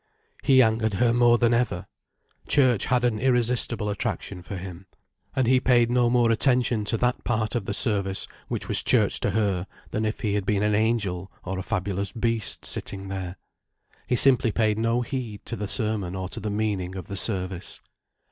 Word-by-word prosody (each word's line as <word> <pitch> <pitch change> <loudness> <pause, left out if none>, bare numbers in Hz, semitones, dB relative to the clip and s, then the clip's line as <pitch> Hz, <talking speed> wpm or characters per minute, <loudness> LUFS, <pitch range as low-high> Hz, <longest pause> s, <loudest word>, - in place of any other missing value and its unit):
He 130 -1 +6
angered 110 -2 0
her 115 +4 +2
more 120 0 +4
than 120 0 +2
ever. 115 -7 0 0.6
Church 125 -7 +3
had 125 -1 +1
an 120 -3 +1
irresistible 120 -3 +1
attraction 100 -2 -4
for 95 +2 -7
him. 90 0 -9 0.5
And 130 - +2
he 130 +2 +4
paid 120 -2 +3
no 120 -1 +3
more 120 -1 +3
attention 120 -2 +2
to 115 - 0
that 125 +2 0
part 110 -2 -1
of 120 -5 -2
the 100 - -3
service 100 -4 +1 0.2
which - - -4
was - - +4
Church - - +3
to - - 0
her, 100 -4 0 0.2
than 110 - -1
if 110 0 -3
he 105 -2 -1
had 105 -1 0
been 100 +1 0
an 105 0 +1
angel 100 -4 0
or 95 +1 -4
a - - -2
fabulous 100 +2 -3
beast 115 -3 -1
sitting 95 -1 -2
there. 95 -2 -5 0.7
He - - +1
simply 125 -2 +4
paid 110 -1 +1
no 115 +2 +1
heed 120 -4 -5
to 115 - -4
the 105 -2 -4
sermon 105 -5 -2
or 95 -1 -4
to - - -7
the 105 - -4
meaning 100 -3 -2
of 95 - -6
the 100 - -7
service. 95 -3 -1
110 Hz, 190 wpm, -25 LUFS, 100-120 Hz, 0.7 s, He